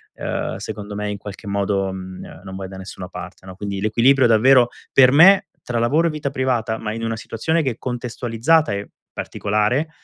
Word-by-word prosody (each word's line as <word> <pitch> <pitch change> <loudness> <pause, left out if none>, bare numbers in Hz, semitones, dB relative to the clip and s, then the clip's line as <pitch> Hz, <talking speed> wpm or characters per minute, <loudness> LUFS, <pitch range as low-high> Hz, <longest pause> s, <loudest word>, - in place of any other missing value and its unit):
ehm, - - -3
secondo 105 0 -7
me 105 0 -3
in 105 - -4
qualche 100 +1 -10
modo, 100 -1 -1
mhmm, 95 -2 -9
non 95 -1 -8
vai 95 -1 -6
da 95 - -10
nessuna 95 -1 -8
parte, 90 0 -10
no? 95 -1 -10
Quindi 100 0 -4
l'equilibrio 120 +5 +4
davvero, 120 +2 +5 0.2
per 130 -1 +6
me 185 +6 +7 0.2
tra 120 - -3
lavoro 150 +9 +2
e - - +1
vita 150 -2 -3
privata, 125 -5 -1
ma 105 - -4
in 115 +1 -5
una 115 0 -1
situazione 140 +9 -1
che 135 -4 0
è 115 - -9
contestualizzata 125 +4 0
e 100 0 -5 0.2
particolare, 105 +9 -1
110 Hz, 190 wpm, -21 LUFS, 100-130 Hz, 0.2 s, me